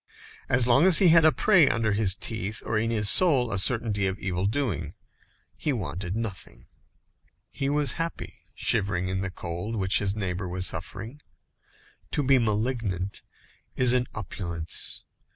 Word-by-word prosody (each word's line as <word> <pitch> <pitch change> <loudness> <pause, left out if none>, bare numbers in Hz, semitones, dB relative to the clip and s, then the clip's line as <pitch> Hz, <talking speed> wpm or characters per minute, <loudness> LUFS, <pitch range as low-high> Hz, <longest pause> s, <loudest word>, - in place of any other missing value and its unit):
As 120 -1 +3
long 135 +8 +5
as 180 -4 +8
he 185 - +6
had 165 -1 +6
a 155 - +7
prey 175 -8 +4
under 115 -1 0
his 100 -2 +3
teeth, 110 -1 -5
or 115 - -2
in 110 +1 0
his 105 -3 0
soul, 135 - +4
a 100 - 0
certainty 105 -2 0
of 95 +1 -3
evil 95 0 -2
doing, 100 - -3 0.6
he 150 - -2
wanted 95 -6 -4
nothing. 95 - -6 0.9
He 135 - -3
was 145 0 +3
happy, 165 0 -6 0.2
shivering 95 -4 0
in 95 0 -2
the 95 - -3
cold 90 +5 -6
which 95 -1 +2
his 100 -1 -1
neighbour 95 -2 -4
was 90 +1 -1
suffering. 100 - -5 0.9
To 145 - 0
be 135 0 +4
malignant 105 -4 -2 0.5
is 125 -1 +2
an 125 -1 +1
opulence. 85 -5 -3
110 Hz, 155 wpm, -26 LUFS, 95-125 Hz, 0.9 s, as